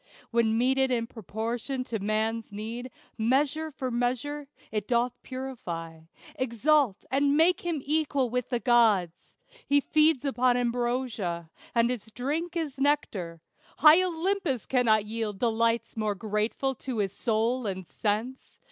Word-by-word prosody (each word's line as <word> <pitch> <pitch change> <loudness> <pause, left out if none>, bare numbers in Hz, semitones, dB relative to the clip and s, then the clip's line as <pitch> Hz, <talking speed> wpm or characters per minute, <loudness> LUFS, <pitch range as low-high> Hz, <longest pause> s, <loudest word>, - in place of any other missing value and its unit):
When 230 -1 +2
meted 265 +2 +2
in 235 -2 0
proportion 230 +4 -4
to 230 -3 -4
man's 220 +2 -1
need, 225 +5 -5 0.3
"Measure 285 +7 +1
for 265 -3 -4
measure" 255 +5 -2 0.2
it 210 -2 -2
doth 240 0 +1
purify, 180 -12 -6 0.3
Exalt, 260 -3 +1
and 280 +2 +3
make 340 +3 +4
him 330 -6 -2
equal 290 -3 +1
with 250 -1 -2
the 245 -2 0
gods. 220 -9 +2 0.3
He 285 0 +4
feeds 305 -1 +3
upon 255 -2 +2
ambrosia, 240 -8 -2 0.2
and 235 +1 +3
his 230 -3 -5
drink 300 +10 -3
Is 295 -5 -3
nectar; 200 - 0 0.4
high 310 +4 +8
Olympus 355 - -1
cannot 225 -5 +3
yield 215 -2 -3
Delights 230 +1 +1
more 215 -2 -1
grateful 215 +6 -1
to 255 -3 -4
his 200 -2 0
soul 230 +2 0
and 190 -2 -4
sense. 220 +8 -3
245 Hz, 135 wpm, -28 LUFS, 220-275 Hz, 0.4 s, high